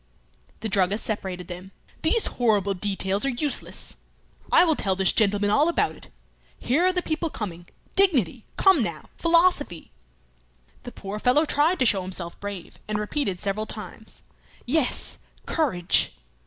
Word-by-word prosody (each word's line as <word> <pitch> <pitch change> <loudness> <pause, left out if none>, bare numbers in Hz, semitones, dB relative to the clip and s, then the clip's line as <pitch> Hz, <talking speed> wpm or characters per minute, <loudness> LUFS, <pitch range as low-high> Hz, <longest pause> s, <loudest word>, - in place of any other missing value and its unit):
The 225 - -2
druggist 195 +1 +1
separated 190 -5 -4
them. 180 +2 -9 0.3
"These 375 +8 +2 0.2
horrible 205 -4 +3
details 195 0 -1
are 275 - +1
useless. 275 +3 -2 0.5
I 345 - +7
will 320 -3 +3
tell 190 -7 0
this 190 0 +2
gentleman 205 -1 +2
all 295 +9 +4
about 340 - +1
it. - - -15 0.5
Here 315 +9 +2
are - - +4
the 360 -1 0
people 320 +1 -2
coming. 175 - -6 0.3
Dignity! 265 - +3
Come 385 -7 +5
now! 170 -8 -4
Philosophy!" 335 - +2 0.9
The 245 - -6
poor 200 -1 -6
fellow 265 +8 +3
tried 315 +5 +2
to 260 - +2
show 205 -4 +3
himself 180 -2 -6
brave, 200 -4 -7
and 210 0 -1
repeated 210 -3 -2
several 210 +2 -2
times. - - -8 0.4
"Yes! 270 +1 -1 0.3
courage!" 230 - +2
215 Hz, 145 wpm, -25 LUFS, 190-300 Hz, 0.9 s, I